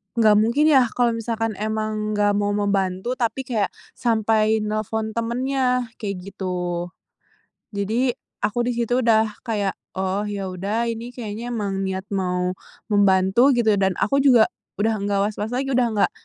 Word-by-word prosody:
nggak 220 -3 +5
mungkin 235 +7 +2
ya 260 -4 +5
kalau 240 -1 +3
misalkan 225 -1 -2
emang 215 0 -2
nggak 205 0 +3
mau 205 0 0
membantu 200 +3 -1
tapi 245 +2 -1
kayak, 225 -6 0 0.3
sampai 220 -2 +2
nelpon 215 +1 -2
temannya, 250 +1 0
kayak 200 -2 -3 0.2
gitu. 180 -2 -3 0.8
Jadi, 220 +5 0 0.3
aku 215 - 0
di 245 - -1
situ 240 +1 +1
udah 220 -3 +2
kayak, 205 -4 0 0.2
"Oh, 190 +2 -1
ya 200 -2 -4
udah 200 +5 -2
ini 235 +2 -7
kayaknya 225 -1 -5
emang 205 -5 -2
niat 190 0 -3
mau 180 -2 0 0.4
membantu" 200 +6 +4
gitu, 235 -2 +3
dan 190 -2 +1
aku 275 +10 +1
juga 250 -5 +5 0.2
udah 220 +2 +1
nggak 200 0 0
was-was 210 0 -4
lagi, 270 +1 -1
udah 250 -2 +3
nggak 205 - +2
215 Hz, 150 wpm, -22 LUFS, 200-235 Hz, 0.8 s, nggak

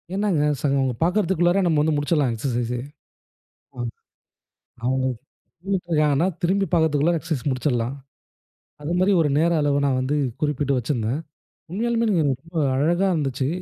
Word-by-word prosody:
என்னாங்க, 195 -7 +1 0.2
சங்க 135 -3 +1
பார்க்குறதுக்குள்ள 175 -1 +2
நம்ம 160 -3 +2
வந்து 155 0 +1
முடிச்சிரலாம் 145 -3 +1
எக்சர்சைஸே. 120 0 -2 1.0
அம். 120 -1 -3 1.0
அவங்க 130 +1 +1 0.6
நின்னுட்டுருக்காங்கன்னா 165 -5 +1 0.2
திரும்பி 195 +3 +2
பார்க்கறதுக்குள்ள 160 -1 +3
எக்சர்சைஸ் 155 -4 -3
முடிச்சுடலாம். 125 -1 -1 0.9
அது 155 - -3
மாதிரி 190 +2 +3
ஒரு 155 - +2
நேர 170 +2 +3
அளவு 145 -1 +2
நான் 130 -2 +1
வந்து 135 +3 0 0.2
குறிப்பிட்டு 145 -2 0
வச்சிருந்தேன். 120 +2 -1 0.5
உண்மையாலுமே 230 +4 0 0.2
எனக்கு 135 -2 -1
ரொம்ப 165 +1 -13 0.2
அழகா 170 +7 +2
இருந்துச்சு. 135 -3 -1
150 Hz, 125 wpm, -23 LUFS, 130-170 Hz, 1.0 s, பார்க்கறதுக்குள்ள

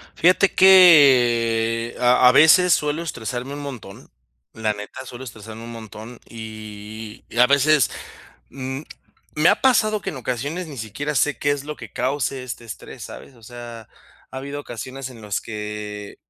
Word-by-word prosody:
Fíjate 185 +3 +3
que 120 -11 +5
a 125 0 +5
a - - +6
veces, 160 +6 +6
suelo 150 +2 -1
estresarme 125 -2 -5
un 145 - -6
montón, 125 -9 -9 0.4
la 110 -1 -1
neta, 105 +5 -9
suelo 125 0 -9
estresarme 110 -1 -10
un 115 - -8
montón. 115 +1 -10
Y 110 -1 -9
y - - -10
a 125 - +7
veces, 140 -1 +3 0.6
mm, 130 +1 -6 0.5
me 155 +2 +4
ha - - +2
pasado 215 -5 +3
que - - -4
en 150 - -8
ocasiones 135 +8 -4
ni 145 -3 -10
siquiera 115 +7 -4
sé 145 +2 +1
qué 145 - 0
es 145 -1 -3
lo 150 0 -6
que 115 -6 -11
cause 130 -1 -2
este 120 -1 -7
estrés, 110 - -10
¿sabes? 135 - -11
O 115 - -21
sea, 120 -1 -10 0.4
ha 130 - -7
habido 140 +2 -6
ocasiones 130 +2 -7
en 120 -3 -13
las 105 -2 -3
que 105 -1 -7
125 Hz, 165 wpm, -22 LUFS, 110-145 Hz, 0.6 s, a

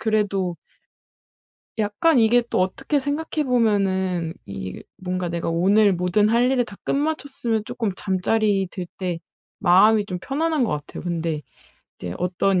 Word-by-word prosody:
그래도 200 -5 0 1.2
약간 220 +7 +3
이게 240 +2 +4
또 - - +1
어떻게 190 +10 0
생각해 300 +2 -2
보면은 190 - +1
이 95 -1 -6 0.2
뭔가 185 -1 -3
내가 170 0 -3
오늘 195 +5 +4
모든 180 +4 +2
할 240 +2 +3
일을 255 -2 +2
다 200 - -12
끝마쳤으면 275 -7 -1
조금 220 -1 -2
잠자리 195 +1 +1
들 185 -2 -5
때 180 -3 -3 0.4
마음이 205 +3 +5
좀 180 -2 -4
편안한 310 +1 0
것 230 - +1
같아요. 150 -1 -5
근데 165 -3 -2 0.6
이제 90 0 -5
어떤 180 +1 +1
200 Hz, 280 characters per minute, -23 LUFS, 180-235 Hz, 1.2 s, 마음이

